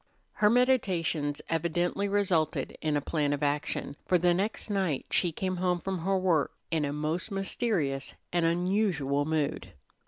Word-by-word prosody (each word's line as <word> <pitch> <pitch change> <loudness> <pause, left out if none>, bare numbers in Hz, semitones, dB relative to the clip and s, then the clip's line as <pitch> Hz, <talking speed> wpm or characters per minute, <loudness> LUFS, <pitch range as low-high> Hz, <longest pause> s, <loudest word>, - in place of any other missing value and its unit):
Her 210 - +4
meditations 185 - +1
evidently 175 +4 0
resulted 190 -6 0
in 155 -2 +1
a - - -1
plan 145 -1 0
of 145 0 -2
action, 145 0 -1
for 180 - +4
the 175 0 +3
next 200 +5 -2
night 190 -9 0
she 175 - +2
came 185 +3 -2
home 180 0 +1
from 190 +1 -3
her 190 +3 +1
work 175 -5 +1 0.2
in 160 -3 +1
a 140 - -2
most 155 +5 -2
mysterious 195 - -1 0.2
and 175 -1 +2
unusual 170 -5 +1
mood. 145 - -1
170 Hz, 155 wpm, -29 LUFS, 150-190 Hz, 0.2 s, Her